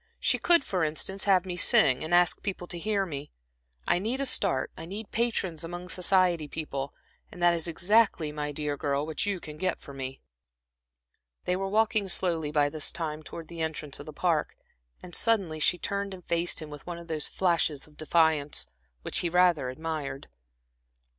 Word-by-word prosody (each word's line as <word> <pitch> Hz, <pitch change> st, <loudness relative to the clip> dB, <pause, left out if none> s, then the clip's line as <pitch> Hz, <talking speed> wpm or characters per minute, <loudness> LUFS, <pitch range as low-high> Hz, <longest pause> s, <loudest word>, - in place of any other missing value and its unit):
"She -, -, +2 dB
could, 345 Hz, -4 st, +5 dB
for 185 Hz, -8 st, -1 dB
instance, 160 Hz, +5 st, -2 dB
have 190 Hz, -2 st, +4 dB
me 180 Hz, -1 st, -4 dB
sing 130 Hz, -6 st, +5 dB
and 160 Hz, -, -5 dB
ask 175 Hz, -1 st, +4 dB
people 190 Hz, -3 st, -4 dB
to 175 Hz, 0 st, -6 dB
hear 200 Hz, +1 st, 0 dB
me. 145 Hz, -4 st, -6 dB, 0.6 s
I -, -, +3 dB
need 230 Hz, +7 st, -2 dB
a 275 Hz, -, 0 dB
start, 205 Hz, -8 st, +2 dB
I 160 Hz, -, -8 dB
need 205 Hz, +3 st, -7 dB
patrons 195 Hz, -8 st, -1 dB
among 175 Hz, +2 st, -6 dB
society 180 Hz, -4 st, +2 dB
people; 140 Hz, -3 st, -5 dB, 0.4 s
and 180 Hz, -, -11 dB
that 175 Hz, 0 st, +6 dB
is 170 Hz, 0 st, -1 dB
exactly, 180 Hz, -2 st, +2 dB
my 150 Hz, -1 st, -3 dB
dear 145 Hz, 0 st, -2 dB
girl, 140 Hz, 0 st, -1 dB
what 160 Hz, +5 st, -2 dB
you 200 Hz, -2 st, -1 dB
can 155 Hz, -2 st, -9 dB
get 185 Hz, +2 st, -2 dB
me." 135 Hz, -1 st, -6 dB, 1.3 s
They 180 Hz, -, +1 dB
were 195 Hz, +1 st, -2 dB
walking 215 Hz, 0 st, +2 dB
slowly 170 Hz, -5 st, +1 dB
by 145 Hz, -1 st, +3 dB
this 150 Hz, 0 st, +1 dB
time 155 Hz, -3 st, -4 dB
towards 165 Hz, +1 st, -9 dB
the 170 Hz, -1 st, -6 dB
entrance 155 Hz, -3 st, -3 dB
of 145 Hz, -, -9 dB
the -, -, -6 dB
Park, 160 Hz, 0 st, 0 dB, 0.5 s
and 180 Hz, -, -10 dB
suddenly 195 Hz, -9 st, +1 dB
she 180 Hz, -, +3 dB
turned 200 Hz, +1 st, -3 dB
and 180 Hz, -, -15 dB
faced 170 Hz, -1 st, 0 dB
him 150 Hz, -, -10 dB
with 150 Hz, +2 st, -10 dB
one 175 Hz, -1 st, -4 dB
of 170 Hz, 0 st, -11 dB
those 155 Hz, -2 st, -1 dB
flashes 165 Hz, -6 st, +1 dB
of 150 Hz, -, -20 dB
defiance, 155 Hz, -2 st, +2 dB, 0.4 s
which -, -, +2 dB
he 175 Hz, -, 0 dB
rather 175 Hz, -6 st, +3 dB
admired. 145 Hz, -, -5 dB
170 Hz, 185 wpm, -28 LUFS, 150-185 Hz, 1.3 s, that